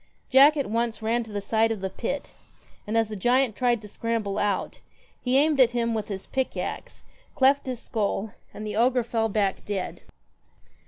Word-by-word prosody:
ack 285 Hz, +3 st, +7 dB
at 280 Hz, -, 0 dB
once 230 Hz, 0 st, -1 dB
ran 230 Hz, +2 st, +1 dB
to 220 Hz, -, -12 dB
the 205 Hz, -, -2 dB
side 225 Hz, +2 st, +2 dB
of 220 Hz, -, -2 dB
the 190 Hz, -, -2 dB
pit, 270 Hz, +8 st, -4 dB, 0.6 s
and 220 Hz, +2 st, 0 dB
as 225 Hz, -1 st, +2 dB
the 215 Hz, -, -5 dB
giant 245 Hz, +3 st, +2 dB
tried 245 Hz, -2 st, +2 dB
to 210 Hz, -, -11 dB
scramble 220 Hz, -2 st, -2 dB
out, 205 Hz, -2 st, -1 dB, 0.4 s
he 255 Hz, +1 st, +2 dB
aimed 295 Hz, 0 st, +3 dB
at 245 Hz, -2 st, +5 dB
him 235 Hz, -1 st, +1 dB
with 215 Hz, -2 st, -2 dB
his 195 Hz, -2 st, -6 dB
pick 265 Hz, -1 st, -2 dB
axe, -, -, -5 dB, 0.3 s
cleft 270 Hz, +1 st, +3 dB
his 250 Hz, -2 st, -3 dB
skull, 210 Hz, -1 st, -2 dB, 0.2 s
and 215 Hz, -, -8 dB
the 210 Hz, -, -4 dB
ogre 245 Hz, +2 st, +3 dB
fell 225 Hz, -1 st, -1 dB
back 200 Hz, -2 st, 0 dB
dead. 200 Hz, -3 st, -4 dB
225 Hz, 195 wpm, -26 LUFS, 210-250 Hz, 0.6 s, ack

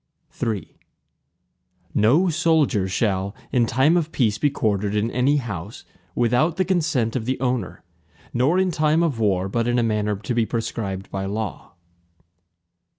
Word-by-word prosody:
III 110 Hz, -4 st, -3 dB, 1.1 s
No 130 Hz, -, +4 dB
soldier 155 Hz, -, +2 dB
shall, 95 Hz, 0 st, -1 dB, 0.2 s
in 120 Hz, -2 st, +2 dB
time 135 Hz, +8 st, +3 dB
of 165 Hz, -2 st, 0 dB
peace 110 Hz, -5 st, +1 dB
be 145 Hz, -, +3 dB
quartered 105 Hz, -6 st, -1 dB
in 110 Hz, +3 st, 0 dB
any 130 Hz, +4 st, +2 dB
house, 105 Hz, -, -6 dB, 0.3 s
without 125 Hz, +8 st, +2 dB
the 185 Hz, -, +2 dB
consent 155 Hz, -11 st, 0 dB
of 120 Hz, -4 st, -2 dB
the 130 Hz, +2 st, -1 dB
owner, 125 Hz, -6 st, -2 dB, 0.5 s
nor 135 Hz, +9 st, +2 dB
in 190 Hz, -1 st, +2 dB
time 155 Hz, +1 st, +2 dB
of 145 Hz, -9 st, -1 dB
war, 95 Hz, -4 st, +1 dB
but 115 Hz, +4 st, -1 dB
in 120 Hz, 0 st, +1 dB
a 120 Hz, -, +2 dB
manner 105 Hz, -2 st, 0 dB
to 100 Hz, +4 st, -4 dB
be 120 Hz, -1 st, +2 dB
prescribed 110 Hz, -4 st, -4 dB
by 95 Hz, 0 st, -3 dB
law. 105 Hz, -3 st, -5 dB
120 Hz, 150 wpm, -23 LUFS, 105-145 Hz, 1.1 s, No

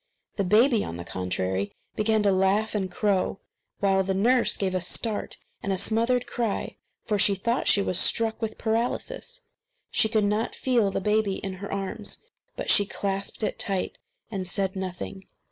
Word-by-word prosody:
The 200 Hz, -, +2 dB
baby, 225 Hz, +4 st, +5 dB
on 85 Hz, -, -5 dB
the 85 Hz, -, -5 dB
contrary, 95 Hz, +2 st, -1 dB, 0.2 s
began 215 Hz, 0 st, +2 dB
to 200 Hz, -, +4 dB
laugh 195 Hz, +3 st, +2 dB
and 195 Hz, -3 st, -1 dB
crow; 195 Hz, 0 st, +1 dB, 0.4 s
while 195 Hz, -1 st, +4 dB
the 190 Hz, 0 st, 0 dB
nurse 240 Hz, +5 st, +3 dB
gave 190 Hz, -2 st, 0 dB
a 185 Hz, -, 0 dB
start 210 Hz, +4 st, -2 dB, 0.2 s
and 200 Hz, -, -2 dB
a 190 Hz, -, +1 dB
smothered 230 Hz, +5 st, +1 dB
cry, 235 Hz, -3 st, -2 dB, 0.3 s
for, 210 Hz, -2 st, +1 dB
she 200 Hz, +1 st, +4 dB
thought 230 Hz, +6 st, 0 dB
she 200 Hz, -, +4 dB
was 185 Hz, -1 st, +1 dB
struck 225 Hz, 0 st, +1 dB
with 220 Hz, -1 st, -3 dB
paralysis: 245 Hz, -, -2 dB, 0.5 s
she 220 Hz, -, +2 dB
could 215 Hz, -1 st, +2 dB
not 210 Hz, +3 st, 0 dB
feel 240 Hz, -6 st, +2 dB
the 195 Hz, -, -2 dB
baby 210 Hz, -1 st, +2 dB
in 195 Hz, -1 st, -4 dB
her 200 Hz, -, -5 dB
arms. 200 Hz, -, -4 dB, 0.3 s
But -, -, 0 dB
she 205 Hz, -, +5 dB
clasped 200 Hz, +1 st, -2 dB
it -, -, -1 dB
tight 195 Hz, -2 st, -1 dB, 0.3 s
and 190 Hz, -3 st, -3 dB
said 190 Hz, +1 st, 0 dB
nothing. 190 Hz, +1 st, -5 dB
200 Hz, 175 wpm, -27 LUFS, 190-220 Hz, 0.5 s, baby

